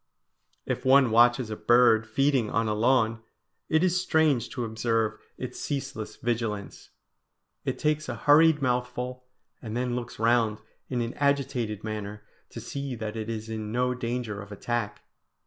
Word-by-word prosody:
If -, -, -3 dB
one 130 Hz, -2 st, +5 dB
watches 120 Hz, 0 st, +4 dB
a -, -, -2 dB
bird 120 Hz, -1 st, +4 dB
feeding 135 Hz, -1 st, +1 dB
on 115 Hz, 0 st, 0 dB
a 105 Hz, -, +1 dB
lawn, 115 Hz, 0 st, +2 dB, 0.5 s
it 160 Hz, +2 st, +3 dB
is 180 Hz, 0 st, +2 dB
strange 155 Hz, -9 st, +2 dB
to 120 Hz, -, -3 dB
observe 110 Hz, 0 st, -1 dB, 0.2 s
its -, -, -6 dB
ceaseless 135 Hz, -5 st, -4 dB
vigilance. 115 Hz, -4 st, -3 dB, 0.8 s
It -, -, -2 dB
takes 150 Hz, 0 st, 0 dB
a -, -, -3 dB
hurried 150 Hz, 0 st, +5 dB
mouthful, 125 Hz, 0 st, -2 dB, 0.4 s
and 110 Hz, 0 st, -5 dB
then 125 Hz, -1 st, -1 dB
looks 120 Hz, -1 st, -5 dB
round 115 Hz, -1 st, +2 dB, 0.3 s
in 125 Hz, -2 st, -1 dB
an 115 Hz, +1 st, -3 dB
agitated 130 Hz, -7 st, 0 dB
manner 105 Hz, -1 st, -5 dB, 0.3 s
to -, -, -8 dB
see 140 Hz, -2 st, -5 dB
that 110 Hz, -1 st, -5 dB
it 110 Hz, 0 st, -4 dB
is 110 Hz, -1 st, -4 dB
in 110 Hz, -1 st, -5 dB
no 125 Hz, +2 st, +1 dB
danger 120 Hz, -4 st, -3 dB
of 105 Hz, 0 st, -11 dB
attack. 115 Hz, +1 st, -3 dB
120 Hz, 155 wpm, -27 LUFS, 110-130 Hz, 0.8 s, one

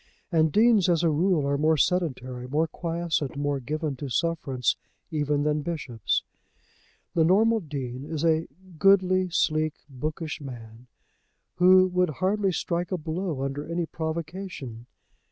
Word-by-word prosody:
And 160 Hz, -2 st, +3 dB
deans 215 Hz, -2 st, +4 dB
as 170 Hz, -1 st, +2 dB
a 165 Hz, -, +3 dB
rule 165 Hz, -1 st, +2 dB
are 140 Hz, 0 st, 0 dB
more 155 Hz, +1 st, +3 dB
sedentary, 130 Hz, -8 st, -1 dB
more 150 Hz, +5 st, +1 dB
quiescent, 165 Hz, -4 st, -2 dB
more 145 Hz, -1 st, 0 dB
given 150 Hz, +3 st, -3 dB
to 140 Hz, +1 st, -5 dB
sufferance 135 Hz, -3 st, 0 dB, 0.4 s
even 145 Hz, -2 st, 0 dB
than 150 Hz, 0 st, +1 dB
bishops. 135 Hz, -, -2 dB, 0.9 s
The 165 Hz, -, +3 dB
normal 220 Hz, +7 st, +4 dB
Dean 135 Hz, -, -5 dB
is 160 Hz, +1 st, -2 dB
a 160 Hz, 0 st, +2 dB, 0.3 s
goodly, 185 Hz, -1 st, +4 dB
sleek, 155 Hz, -2 st, +1 dB
bookish 155 Hz, +3 st, -5 dB
man, 120 Hz, -3 st, -10 dB, 0.7 s
who 185 Hz, +1 st, +7 dB
would 180 Hz, -1 st, +2 dB
hardly 195 Hz, +5 st, 0 dB
strike 175 Hz, +1 st, -2 dB
a 185 Hz, -, 0 dB
blow 160 Hz, -2 st, -3 dB
under 140 Hz, +1 st, -3 dB
any 170 Hz, 0 st, 0 dB
provocation. 160 Hz, -, -5 dB
155 Hz, 135 wpm, -26 LUFS, 140-175 Hz, 0.9 s, who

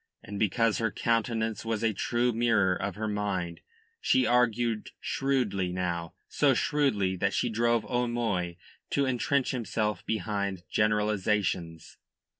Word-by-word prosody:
And 100 Hz, 0 st, -6 dB
because 115 Hz, +1 st, +2 dB
her 115 Hz, -1 st, +1 dB
countenance 115 Hz, -1 st, 0 dB
was 115 Hz, -1 st, -2 dB
a 110 Hz, -1 st, +2 dB
true 120 Hz, +4 st, 0 dB
mirror 110 Hz, -5 st, +3 dB
of 100 Hz, +1 st, -3 dB
her 110 Hz, +1 st, -3 dB
mind, 100 Hz, -5 st, -2 dB, 0.4 s
she 260 Hz, -10 st, +3 dB
argued 120 Hz, -2 st, +1 dB
shrewdly 120 Hz, -10 st, 0 dB
now, 85 Hz, -2 st, -3 dB
so -, -, +3 dB
shrewdly 105 Hz, -11 st, +1 dB
that 100 Hz, +1 st, 0 dB
she 120 Hz, -, +1 dB
drove 115 Hz, +1 st, +1 dB
O'Moy 115 Hz, -8 st, -1 dB, 0.3 s
to 140 Hz, -, +1 dB
entrench 130 Hz, +1 st, +1 dB
himself 110 Hz, -4 st, -2 dB
behind 100 Hz, -4 st, -2 dB
generalisations. 105 Hz, -5 st, 0 dB
110 Hz, 125 wpm, -29 LUFS, 100-120 Hz, 0.4 s, mirror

